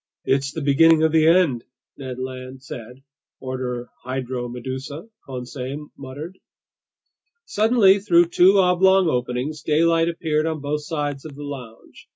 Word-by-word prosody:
"It's 135 Hz, 0 st, +1 dB
the 160 Hz, -, -5 dB
beginning 160 Hz, +3 st, +5 dB
of 160 Hz, -, +3 dB
the 160 Hz, 0 st, +4 dB
end!" 165 Hz, -9 st, +3 dB, 0.3 s
Ned 130 Hz, -2 st, -7 dB
Land 130 Hz, 0 st, -7 dB
said. 125 Hz, 0 st, -10 dB, 0.2 s
"... -, -, -71 dB
order 125 Hz, -2 st, -4 dB, 0.2 s
Hydromedusa," 130 Hz, -, -5 dB, 0.2 s
Conseil 130 Hz, +3 st, -6 dB
muttered. 145 Hz, +7 st, -9 dB, 1.1 s
Suddenly, 210 Hz, -2 st, +4 dB
through 175 Hz, -3 st, +3 dB
two 185 Hz, +3 st, +5 dB
oblong 190 Hz, 0 st, +4 dB
openings, 125 Hz, +3 st, -2 dB
daylight 165 Hz, +2 st, +2 dB
appeared 160 Hz, -2 st, -1 dB
on 160 Hz, -1 st, -2 dB
both 145 Hz, +1 st, -3 dB
sides 145 Hz, -3 st, -3 dB
of 155 Hz, -3 st, -10 dB
the 145 Hz, -, -8 dB
lounge. 125 Hz, -6 st, -10 dB
145 Hz, 135 wpm, -22 LUFS, 130-165 Hz, 1.1 s, beginning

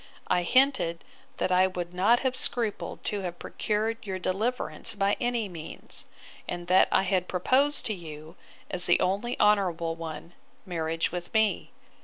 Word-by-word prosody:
I 180 Hz, -1 st, +3 dB
hinted, 245 Hz, -6 st, +2 dB, 0.3 s
that -, -, 0 dB
I 185 Hz, +1 st, +5 dB
would 180 Hz, -2 st, -5 dB
not 210 Hz, +7 st, +4 dB
have 260 Hz, -1 st, 0 dB
scrupled 235 Hz, -4 st, -1 dB
to 205 Hz, -, -1 dB
have 175 Hz, -2 st, -5 dB
procured 220 Hz, +2 st, -2 dB
your 190 Hz, -1 st, -2 dB
deliverance 215 Hz, +7 st, -1 dB
by 200 Hz, 0 st, +2 dB
any 240 Hz, -3 st, 0 dB
means; 165 Hz, -4 st, -6 dB, 0.4 s
and 175 Hz, 0 st, -4 dB
that 185 Hz, +2 st, +5 dB
I -, -, +4 dB
had 185 Hz, -1 st, 0 dB
proposed 265 Hz, +11 st, +2 dB
to 220 Hz, -, +1 dB
you, 160 Hz, -2 st, -9 dB, 0.4 s
as 180 Hz, -1 st, -2 dB
the 175 Hz, -, +5 dB
only 200 Hz, +6 st, 0 dB
honourable 180 Hz, -6 st, +2 dB
one, 165 Hz, +1 st, -7 dB, 0.3 s
marriage 165 Hz, -2 st, -1 dB
with 175 Hz, 0 st, -5 dB
me. 220 Hz, -1 st, +2 dB
185 Hz, 155 wpm, -28 LUFS, 175-220 Hz, 0.4 s, I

